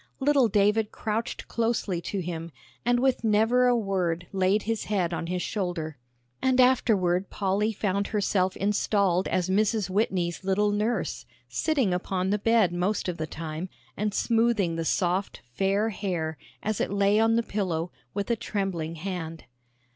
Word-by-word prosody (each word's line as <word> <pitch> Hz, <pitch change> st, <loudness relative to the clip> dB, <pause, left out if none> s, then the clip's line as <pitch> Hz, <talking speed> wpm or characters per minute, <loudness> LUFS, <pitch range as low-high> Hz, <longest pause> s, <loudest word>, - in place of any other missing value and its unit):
Little 275 Hz, -2 st, +4 dB
David 210 Hz, +1 st, +2 dB
crouched 220 Hz, +2 st, -3 dB
closely 225 Hz, -6 st, -1 dB
to 195 Hz, +2 st, -3 dB
him, 170 Hz, -1 st, -5 dB, 0.3 s
and 245 Hz, 0 st, +2 dB
with 260 Hz, -1 st, +1 dB
never 225 Hz, +3 st, +4 dB
a 245 Hz, -1 st, +4 dB
word 180 Hz, -5 st, -1 dB
laid 195 Hz, +2 st, +2 dB
his 225 Hz, 0 st, -2 dB
head 185 Hz, -5 st, 0 dB
on 165 Hz, -, -3 dB
his 180 Hz, 0 st, -2 dB
shoulder. 170 Hz, -, -3 dB, 0.4 s
And 260 Hz, -1 st, +2 dB
afterward 200 Hz, -8 st, +3 dB
Polly 200 Hz, +2 st, 0 dB
found 200 Hz, -1 st, -1 dB
herself 190 Hz, -3 st, 0 dB
installed 200 Hz, -2 st, +1 dB
as 180 Hz, -1 st, 0 dB
Mrs. 205 Hz, 0 st, +1 dB
Whitney's 185 Hz, -4 st, 0 dB
little 200 Hz, +2 st, +2 dB
nurse, 215 Hz, +3 st, -1 dB, 0.2 s
sitting 275 Hz, -, +1 dB
upon 185 Hz, +1 st, -1 dB
the 210 Hz, -, +1 dB
bed 220 Hz, -4 st, +3 dB
most 185 Hz, +4 st, 0 dB
of 180 Hz, -2 st, -2 dB
the 155 Hz, -, -3 dB
time, 160 Hz, +3 st, -5 dB, 0.3 s
and 210 Hz, +1 st, -1 dB
smoothing 225 Hz, -6 st, +2 dB
the 165 Hz, 0 st, -2 dB
soft, 185 Hz, +3 st, 0 dB
fair 195 Hz, -, +1 dB
hair, 175 Hz, -6 st, -2 dB, 0.3 s
as 215 Hz, -1 st, -1 dB
it -, -, 0 dB
lay 200 Hz, +1 st, +3 dB
on 225 Hz, 0 st, +4 dB
the 235 Hz, -, +2 dB
pillow, 180 Hz, -6 st, -2 dB, 0.2 s
with 200 Hz, +3 st, -1 dB
a -, -, +3 dB
trembling 190 Hz, -7 st, -3 dB
hand. 165 Hz, -2 st, -5 dB
200 Hz, 155 wpm, -27 LUFS, 180-220 Hz, 0.4 s, Little